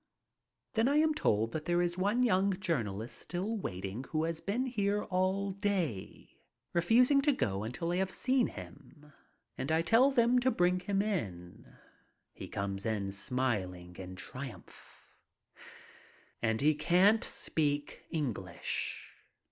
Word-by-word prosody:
Then 225 +1 +3
I 280 - +2
am 310 +1 +4
told 110 - +1
that 155 -1 -4
there 175 0 +2
is 175 0 +1
one 205 +7 +1
young 200 -4 +3
journalist 115 - -2
still 190 +6 -3
waiting 95 - -4
who 155 0 -1
has 165 0 -2
been 230 +6 -1
here 210 -4 0
all 190 +2 0
day, 185 - -3 0.3
refusing 245 - +5
to 290 +1 +3
go 100 - -1
until 125 +10 -3
I 175 - 0
have 190 0 +1
seen 255 +4 +2
him. 150 -1 -12 0.5
And 140 - -2
I 160 +1 +3
tell 230 +10 +5
them 250 -2 +4
to 255 +1 +2
bring 180 -5 +2
him 195 +2 0
in. 95 - -4 0.6
He - - -8
comes 100 0 -3
in 105 -3 -1
smiling 95 -5 -2
in 95 -1 -7
triumph. 125 -1 -10 1.4
And 110 0 +1
he 155 +2 +5
can't 180 +8 +4
speak 145 -2 -1
English. 145 - -3
170 Hz, 140 wpm, -32 LUFS, -, 1.4 s, refusing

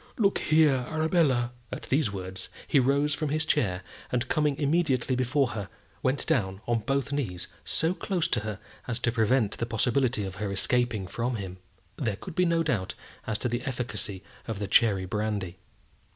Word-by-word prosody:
Look 200 -3 +3
here, 150 -5 +4
Arabella!" 155 -7 +2 0.2
At - - -5
these 135 -5 +1
words 95 -1 -6 0.2
he 145 - +4
rose 140 +3 +3
from 155 -1 -1
his 155 +2 0
chair, 95 -11 +1 0.3
and 125 -1 0
coming 150 -2 +1
immediately 140 -4 +2
before 130 +1 +2
her, 105 -4 -5 0.3
went 130 +2 +1
down 95 -6 +1
on 120 -1 +1
both 135 +4 -1
knees 110 -12 -2 0.2
so 165 +3 +1
close 185 -3 -1
to 120 - +2
her 105 -1 -5 0.3
as 120 -2 -1
to 120 -1 +1
prevent 115 -1 +2
the 115 - -1
possibility 120 0 +1
of 95 0 -6
her 105 -1 -2
escaping 115 0 +2
from 120 +6 -2
him. 95 -3 -6 0.4
There 115 -7 -1
could 180 - -9
be 180 +3 +3
no 165 -1 +2
doubt 110 - -1 0.3
as 110 - 0
to - - +5
the 120 +1 -1
efficacy 105 -7 -3 0.2
of 110 -3 -3
the 100 0 -3
cherry 100 -1 +4
brandy. 100 -2 -2
120 Hz, 180 wpm, -28 LUFS, 105-140 Hz, 0.4 s, to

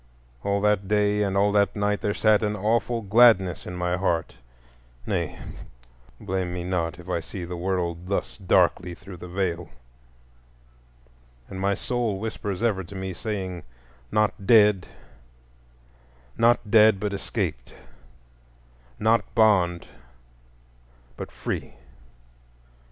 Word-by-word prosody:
All 100 0 0
that 105 -2 +1
day 105 0 +2
and 100 -1 0
all 100 +1 +3
that 100 0 +2
night 105 0 0
there 105 - -1
sat 110 -1 +3
an 105 -1 -1
awful 115 +3 0
gladness 100 -4 +4
in 90 - -6
my 90 0 -1
heart,—nay, - - -4 0.8
blame 95 -1 -3
me 90 0 -4
not 85 -2 -2
if 90 0 -13
I 90 -2 -1
see 90 +2 -7
the 90 +1 -6
world 85 -1 -2
thus 100 +2 -3
darkly 90 -2 +2
through 90 0 -11
the 90 - -9
Veil,—and 85 -2 -2 1.9
my 100 +1 +1
soul 120 -1 -2
whispers 105 -1 -4
ever 105 -5 +1
to 95 +3 -11
me 95 0 -4
saying, 95 -3 -4 0.5
"Not 105 -2 0
dead, 105 -5 +5 1.5
not 115 -2 +2
dead, 110 -2 +6
but 105 0 -2
escaped; - - -4 1.2
not 115 +1 +3
bond, 95 -6 +3 1.3
but - - -7
free." - - -5
95 Hz, 120 wpm, -25 LUFS, 90-105 Hz, 1.9 s, dead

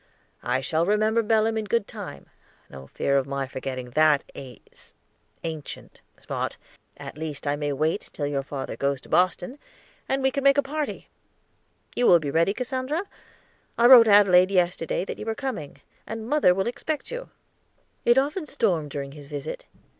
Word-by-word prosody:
"I 130 - 0
shall 160 +3 0
remember 215 +2 +2
Belem 220 0 +2
in 215 - -4
good 215 0 0
time; 205 -5 -8 0.5
no 65 0 -10
fear 140 - +1
of 135 - -4
my 140 0 -2
forgetting 130 -1 -6
that 155 0 +4
ace 125 -4 -13 0.5
ancient 160 -3 -7 0.2
spot. - - -4 0.4
At - - -9
least 155 -3 -6
I 145 0 +1
may 145 0 -2
wait 155 +7 -1
till 145 - -4
your 145 -1 -1
father 135 -1 -6
goes 140 -1 -1
to - - -17
Boston, 185 +8 +1 0.5
and 270 0 0
we 265 - +3
can 275 +1 -2
make 275 0 +5
a 285 - +4
party. 295 +2 -4 0.9
You 245 - +2
will 175 - +8
be 150 -4 -3
ready, 165 +5 +3
Cassandra? 260 +6 -2 0.7
I 235 - +4
wrote 240 -2 +9
Adelaide 195 -3 +6
yesterday 180 -2 0
that - - -6
you - - -6
were 225 - -1
coming, 220 - -5 0.3
and 225 0 -6
mother 275 -11 +4
will 190 0 0
expect 295 +5 -4
you." - - -6 0.7
It 240 +1 +4
often 300 +5 0
stormed 170 - 0
during 140 -1 -5
his 145 -1 -12
visit. 145 -2 -6
180 Hz, 170 wpm, -25 LUFS, 145-240 Hz, 0.9 s, wrote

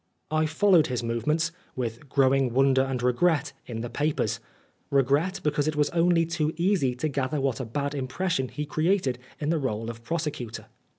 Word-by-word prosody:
I 155 0 +2
followed 175 +1 +4
his 125 -2 -2
movements, 150 +9 0 0.2
with 120 +2 -4
growing 135 -2 +3
wonder 135 0 +4
and 130 -2 -2
regret, 140 +3 +2
in 115 -2 -4
the 120 - -4
papers, 150 +1 0 0.5
regret, 140 +8 +2
because 150 -1 +1
it 155 - 0
was 150 -1 +1
only 170 0 +3
too 160 -1 -1
easy 170 -8 +2
to 140 +5 -1
gather 140 0 -1
what 135 -4 0
a 130 - -3
bad 140 +5 -2
impression 135 +1 -1
he 150 +4 -5
created 155 -4 +1 0.2
in 150 - -1
the 165 - +1
r61e 115 -4 -2
of 115 0 -12
prosecutor. 150 -6 -4
140 Hz, 175 wpm, -27 LUFS, 130-160 Hz, 0.5 s, followed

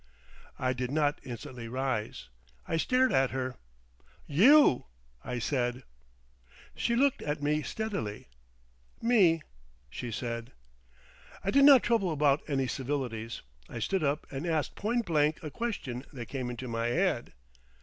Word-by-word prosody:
I 130 0 0
did 125 0 -3
not 145 0 +1
instantly 120 -1 -7
rise. 130 - -3 0.4
I 165 - 0
stared 255 +8 +2
at 135 -1 +3
her. 130 -1 -3 0.7
"You!" 220 - +6 0.4
I 125 - -4
said. 125 0 -1 0.9
She 235 - 0
looked 275 +2 +2
at 145 0 -3
me 150 +1 +1
steadily. 170 - -4 0.7
"Me," 190 -9 +4 0.5
she 120 - -5
said 115 +1 -4 0.9
I 195 - 0
did 275 +3 +6
not 280 -3 +8
trouble 220 -7 +2
about 145 -1 +3
any 135 -3 0
civilities. 125 -3 -3 0.3
I - - -7
stood 170 - -1
up 145 +1 0
and 140 +5 -4
asked 160 -3 0
point 230 +3 -1
blank 155 -2 +2
a 155 - -5
question 140 - -4
that 120 -4 -7
came 130 -3 -3
into 125 +1 -6
my 115 0 -1
head. 165 -1 0
140 Hz, 140 wpm, -30 LUFS, 125-180 Hz, 0.9 s, not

